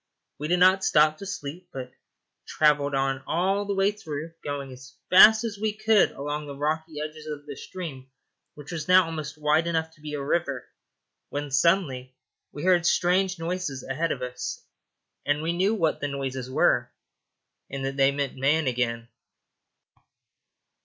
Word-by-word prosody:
We 150 - -3
did 175 +2 +2
not 185 +2 +5
stop 155 -2 +4
to 195 - -7
sleep, 180 -2 -6
but 125 -1 -7 0.6
travelled 145 -2 +2
on 135 0 0
all 195 +4 0
through 200 - -1
the 195 -6 -1
day, - - -28
going 140 -2 -4
as 130 +1 -13 0.2
fast 215 +4 +8
as 220 -3 -4
we 215 -1 0
could 215 -1 +3
along 145 +2 -4
the 140 -1 -8
rocky 155 +2 -2
edges 155 0 -6
of 145 -1 -6
the 145 -1 -7
stream, 140 -7 -8 0.5
which 150 +1 -10
was 160 -3 -5
now 185 0 +6
almost 155 -2 -6
wide 155 +2 +2
enough 160 -1 -1
to 160 -2 -23
be 150 -1 -5
a 140 - -4
river, 140 -4 -1 0.6
when 145 0 -4
suddenly 140 -5 +1 0.4
we 145 - -7
heard 175 -2 +3
strange 185 +2 +2
noises 165 -5 -3
ahead 155 +5 -2
of - - -3
us, 125 0 -5 0.6
and 145 +1 0
we 165 +1 0
knew 190 +5 +1
what 165 -7 0
the 145 - -1
noises 135 -2 -4
were, 130 - +2 0.8
and 135 0 -4
that 135 0 -3
they 135 0 +4
meant 140 -1 -3
man 145 +4 +2
again. 120 -2 -1
150 Hz, 165 wpm, -26 LUFS, 140-180 Hz, 0.8 s, fast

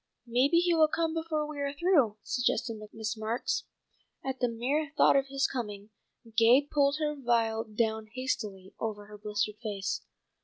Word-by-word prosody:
"Maybe 255 +7 +3
he 350 0 +4
will 320 -2 +5
come 325 +1 0
before 320 -2 -1
we 300 -1 -7
are 280 0 -1
through," 285 - +3
suggested 245 -3 0
Miss 220 0 -3
Marks. 220 +2 -2 0.6
At 265 -1 -3
the 245 - +2
mere 270 +6 -1
thought - - +6
of 275 0 +3
his 275 0 0
coming, 210 -4 -4 0.4
Gay 235 +4 +7
pulled 285 0 +2
her 300 -1 0
veil 230 -4 +1
down 220 0 -1
hastily 210 -7 -4
over 210 -2 -3
her 210 0 -12
blistered 210 0 -2
face. 205 -4 -2
245 Hz, 160 wpm, -30 LUFS, 220-285 Hz, 0.6 s, Gay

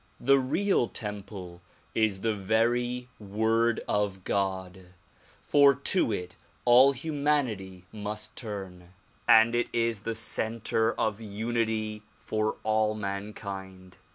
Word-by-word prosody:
The 135 +2 +4
real 135 +2 +1
temple 100 -5 -6 0.3
is 110 -4 +1
the 110 -1 +1
very 120 +4 0
Word 110 +3 +1
of 100 -2 -1
God; 95 -2 -2 0.5
for 140 -1 +5
to 140 0 +2
it 90 -3 -4 0.3
all 125 +3 +7
humanity 130 - -2
must 105 0 -5
turn 95 -5 -7 0.3
and 110 +1 +7
it 120 0 +1
is 115 -2 0
the 115 +1 -3
center 115 0 0
of 110 0 -1
unity 110 0 -2
for 110 0 -2
all 110 0 +1
mankind. 100 -2 -6
110 Hz, 110 wpm, -28 LUFS, 100-120 Hz, 0.5 s, all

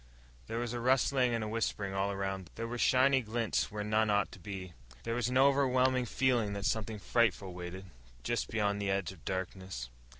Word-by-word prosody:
There 115 - -3
was 120 0 -2
a 120 - -2
rustling 130 +1 +3
and 115 - -1
a - - -3
whispering 105 -3 -2
all 95 +1 0
around 95 -1 -3
them. - - -21
There 115 - -4
were 120 +1 -4
shiny 130 +2 +4
glints 115 0 -1
where 105 0 -3
none 110 +1 +2
ought 105 0 +2
to - - -11
be. 95 -4 -7 0.3
There 115 - -2
was 120 0 0
an 125 - +1
overwhelming 130 -2 +4
feeling 120 -4 +1
that 100 0 -4
something 110 -1 -1
frightful 100 -3 +1
waited 90 +2 -7 0.4
just - - -1
beyond 105 -2 0
the 100 - -1
edge 95 -1 0
of 90 -5 -15
darkness. 95 -9 -4
110 Hz, 200 wpm, -32 LUFS, 95-120 Hz, 0.4 s, shiny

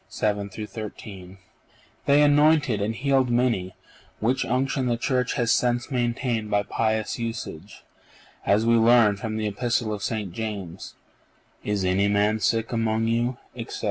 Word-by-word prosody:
7 105 -1 -1
13), 100 -2 -8 0.7
they 145 +1 +5
anointed 145 -5 +4
and 110 +2 -1
healed 135 0 +1
many, 120 -7 0 0.4
which 125 +4 +1
unction 130 +1 0
the 120 -1 +1
Church 125 0 0
has 115 -2 +1
since 120 +2 +1
maintained 120 -3 -1
by 105 0 +1
pious 110 +2 -1
usage, 115 -6 -6 0.6
as 105 +3 +2
we 115 - +4
learn 115 -2 +5
from 110 +1 -4
the 110 - -2
Epistle 110 +1 -1
of 105 - -5
St. 105 -4 -3
James: 100 -5 -6 0.7
'Is 100 -2 -1
any 95 +2 +2
man 105 +1 +2
sick 115 +1 0
among 115 -1 0
you,'_ 120 +2 0 0.2
etc. 115 -2 -6
115 Hz, 140 wpm, -25 LUFS, 105-120 Hz, 0.7 s, they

